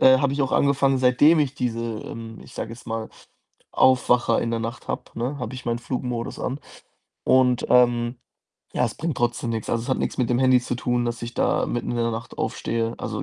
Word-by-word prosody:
Äh, 130 Hz, 0 st, +7 dB
habe 140 Hz, 0 st, +1 dB
ich 145 Hz, -, -2 dB
auch 135 Hz, -, -1 dB
angefangen, 140 Hz, -1 st, +3 dB
seitdem 140 Hz, +6 st, +5 dB
ich 145 Hz, -2 st, 0 dB
diese 115 Hz, -2 st, -1 dB, 0.2 s
ähm, 115 Hz, -1 st, -8 dB
ich -, -, -15 dB
sage 110 Hz, -, -4 dB
jetzt 115 Hz, -, -11 dB
mal, 115 Hz, -1 st, -4 dB, 0.6 s
Aufwacher 125 Hz, -2 st, +4 dB
in 115 Hz, -, -1 dB
der 115 Hz, -1 st, -1 dB
Nacht 115 Hz, +1 st, -6 dB
habe, -, -, -2 dB
ne, 125 Hz, +5 st, -3 dB
habe 125 Hz, 0 st, -5 dB
ich 125 Hz, -1 st, -9 dB
meinen 120 Hz, 0 st, 0 dB
Flugmodus 125 Hz, -2 st, -4 dB
an 135 Hz, -, -2 dB, 0.7 s
und, 125 Hz, -1 st, +4 dB
ähm 120 Hz, -1 st, +4 dB, 0.6 s
ja, -, -, +2 dB
es -, -, -2 dB
bringt 160 Hz, -1 st, -2 dB
trotzdem 120 Hz, 0 st, 0 dB
nix. 110 Hz, -2 st, -3 dB
Also, 115 Hz, 0 st, 0 dB
es -, -, -9 dB
hat 130 Hz, -, +2 dB
nix -, -, -2 dB
mit 125 Hz, -3 st, +1 dB
dem 120 Hz, -, +2 dB
Handy 130 Hz, -1 st, +5 dB
zu 125 Hz, -, -3 dB
tun, 120 Hz, 0 st, 0 dB
dass 120 Hz, 0 st, -3 dB
ich 120 Hz, 0 st, -5 dB
da -, -, +1 dB
mitten 120 Hz, -, -2 dB
in 120 Hz, -, -2 dB
der 115 Hz, 0 st, +1 dB
Nacht 115 Hz, +1 st, -6 dB
aufstehe. 115 Hz, 0 st, -1 dB
Also, -, -, -4 dB
120 Hz, 220 wpm, -24 LUFS, 115-130 Hz, 0.7 s, Äh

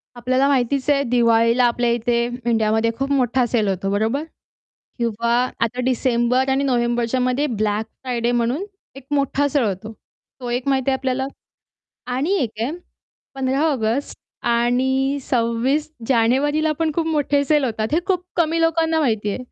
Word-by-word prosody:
आपल्याला 255 Hz, +3 st, +1 dB
माहितीच 275 Hz, 0 st, +1 dB
आहे 280 Hz, -1 st, +3 dB
दिवाळीला 230 Hz, -1 st, +3 dB
आपल्या 240 Hz, 0 st, +1 dB
इथे 235 Hz, 0 st, +1 dB, 0.2 s
इंडियामध्ये 220 Hz, -1 st, +2 dB
खूप 270 Hz, +1 st, -2 dB
मोठा 255 Hz, -2 st, +2 dB
सेल 225 Hz, -3 st, 0 dB
होतो 195 Hz, 0 st, -1 dB
बरोबर? 220 Hz, +8 st, 0 dB, 0.8 s
किंवा 235 Hz, 0 st, 0 dB, 0.3 s
आता 235 Hz, +2 st, 0 dB
डिसेंबर 250 Hz, 0 st, +1 dB
आणि 270 Hz, +1 st, +1 dB
नोव्हेंबरच्यामध्ये 250 Hz, +2 st, +1 dB
ब्लॅक 215 Hz, -3 st, -1 dB, 0.2 s
फ्रायडे 240 Hz, -2 st, -1 dB
म्हणून 240 Hz, +8 st, 0 dB, 0.3 s
एक 270 Hz, -, -11 dB
मोठा 285 Hz, 0 st, +1 dB
सण 285 Hz, -1 st, +1 dB
होतो. 215 Hz, +2 st, -3 dB, 0.5 s
तो 245 Hz, -, -5 dB
एक 245 Hz, +3 st, -2 dB
माहिती 270 Hz, -1 st, +1 dB
आहे 265 Hz, -, +2 dB
आपल्याला. 265 Hz, 0 st, -1 dB, 0.8 s
आणि 265 Hz, +8 st, -1 dB
एक 235 Hz, -, -1 dB
आहे 240 Hz, -, -1 dB, 0.6 s
15 270 Hz, +1 st, 0 dB
ऑगस्ट 245 Hz, 0 st, -1 dB, 0.3 s
आणि 260 Hz, +4 st, +1 dB
26 250 Hz, +4 st, 0 dB, 0.2 s
जानेवारीला 275 Hz, +6 st, +2 dB
पण 325 Hz, -1 st, 0 dB
खूप 330 Hz, 0 st, 0 dB
मोठे 290 Hz, -2 st, +1 dB
सेल 295 Hz, -1 st, +2 dB
होतात. 220 Hz, -3 st, -1 dB
हे 315 Hz, -, +4 dB
खूप 365 Hz, -2 st, 0 dB
कमी 330 Hz, -1 st, +1 dB
लोकांना 325 Hz, 0 st, +2 dB
माहिती 220 Hz, -7 st, 0 dB
आहे. 200 Hz, -, -3 dB
255 Hz, 150 wpm, -21 LUFS, 235-280 Hz, 0.8 s, हे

